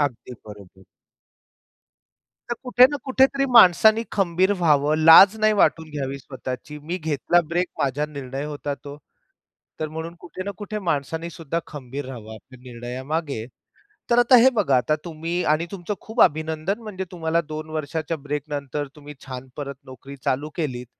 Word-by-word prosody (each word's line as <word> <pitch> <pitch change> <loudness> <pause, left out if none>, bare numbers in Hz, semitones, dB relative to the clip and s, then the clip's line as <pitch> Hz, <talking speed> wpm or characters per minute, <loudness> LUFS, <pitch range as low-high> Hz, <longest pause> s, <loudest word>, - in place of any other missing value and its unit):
अगदी 125 -3 -2
बरोबर. 100 -3 -13 1.7
तर - - +1
कुठे 250 -1 +6
ना 290 - -2
कुठेतरी 270 +1 +3
माणसाने 220 +1 +7
खंबीर 185 -1 +2
व्हावं. 150 -3 +3
लाज 190 +6 +9
नाही 215 0 +3
वाटून 160 -4 +2
घ्यावी 140 -2 -4
स्वतःची. 130 +2 -7
मी 160 +5 -4
घेतला 160 +2 +1
ब्रेक 175 +2 0
माझा 140 +2 0
निर्णय 140 -2 -6
होता 145 -1 -4
तो. 140 0 -11 0.8
तर 155 - -2
म्हणून 160 +2 -6
कुठे 175 +1 -8
ना 200 - -3
कुठे 210 0 -5
माणसाने 165 -2 -2
सुद्धा 165 0 -4
खंबीर 140 -1 -7
रहावं 115 -4 -9
आपल्या 125 +4 -15
निर्णयामागे. 130 +2 -4 0.6
तर 235 - +4
आता 245 +1 +6
हे 250 +2 +7
बघा, 190 - +2
आता 125 +5 +2
तुम्ही 170 +1 -3
आणि 160 +2 0
तुमचं 195 +1 -4
खूप 225 +2 -4
अभिनंदन. 160 +5 +1
म्हणजे 195 -4 -5
तुम्हाला 165 -2 0
2 155 0 -6
वर्षाच्या 155 +1 -3
ब्रेक 145 0 -4
नंतर 145 0 -4
तुम्ही 150 0 -11
छान 130 -1 -7
परत 140 -1 -5
नोकरी 130 +2 -11
चालू 145 +4 -1
केलीत. 125 -7 -3
155 Hz, 155 wpm, -23 LUFS, 140-175 Hz, 1.7 s, लाज